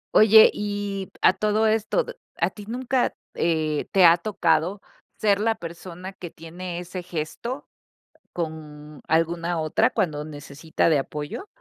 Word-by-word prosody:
Oye 220 0 +8
y, 205 -2 -4
a - - +7
todo 215 +2 +1
esto, 220 - +1 0.3
¿a - - +1
ti 205 - -11
nunca, 250 +2 0 0.2
eh, 155 -3 0
te 190 -2 +6
ha 170 0 +8
tocado 180 -1 +1 0.4
ser 205 -2 +2
la 225 +1 +1
persona 180 0 -8
que 180 -2 -8
tiene 170 +2 -7
ese 180 +1 -6
gesto 180 - -5 0.6
con 155 -3 -7
alguna 165 +1 +1
otra 160 +9 +2
cuando 155 -10 -1
necesita 150 +1 -3
de 155 -3 +4
apoyo? 150 - -5
175 Hz, 135 wpm, -24 LUFS, 160-210 Hz, 0.6 s, Oye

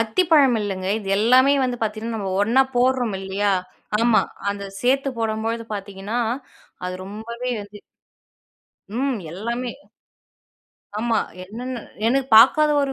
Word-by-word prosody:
அத்திப்பழம் 275 +1 +4
இல்லங்க. 190 -2 -3
இது 195 -2 -8
எல்லாமே 255 +5 +5
வந்து 250 -1 -1
பாத்தீங்கன்னா, 220 +1 -2
நம்ம 195 -2 -3
ஒண்ணா 240 +6 +4
போட்றோம் 245 -4 +2
இல்லையா? 195 +1 0 0.5
ஆமா 230 -1 +4 0.3
அந்த 200 0 -5 0.2
சேர்த்து 270 +2 +2
போடும்பொழுது 225 +1 -2
பாத்தீங்கன்னா, 200 +3 -5 0.7
அது 180 0 -3
ரொம்பவே 230 +5 -5
வந்து 205 0 -13 1.2
ம். 265 -1 0
எல்லாமே. 235 +7 -3 1.3
ஆமா. 230 0 +1 0.2
என்னென்னு 240 +6 -6 0.3
எனக்கு 265 +2 +1
பாக்காத 300 +7 +7
ஒரு 275 -1 -1
230 Hz, 115 wpm, -22 LUFS, 205-255 Hz, 1.3 s, பாக்காத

